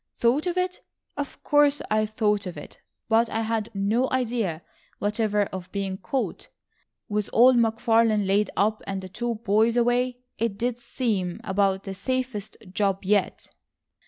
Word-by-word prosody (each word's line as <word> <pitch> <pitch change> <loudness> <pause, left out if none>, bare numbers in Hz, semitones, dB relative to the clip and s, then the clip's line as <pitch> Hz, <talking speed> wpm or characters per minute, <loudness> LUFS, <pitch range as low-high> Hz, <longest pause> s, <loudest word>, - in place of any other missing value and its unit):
"Thought 260 +8 +2
of 355 0 -1
it! 365 0 -1 0.3
Of 285 -1 -6
course 290 -1 +4
I 215 0 +2
thought 210 -2 0
of 175 - -7
it. 145 - -11 0.3
But 225 +1 +3
I 225 - -1
had 225 -1 -1
no 215 +6 +1
idea 230 -10 -1 0.3
whatever 210 0 +1
of 185 -1 -6
being 195 -1 -3
caught, 265 +5 -3 0.6
with 210 -1 -1
old 250 +2 +6
McFarlane 225 -2 +3
laid 200 +2 +2
up 215 +2 +2
and 195 -1 -3
the 185 - -7
two 235 +5 -2
boys 220 +2 +2
away, 245 +1 +2 0.2
it 225 -3 -1
did 245 +1 -1
seem 205 -8 -2
about 190 0 +1
the 195 - -5
safest 255 0 -3 0.2
job 195 -1 0
yet." 200 0 0
220 Hz, 155 wpm, -25 LUFS, 200-245 Hz, 0.6 s, old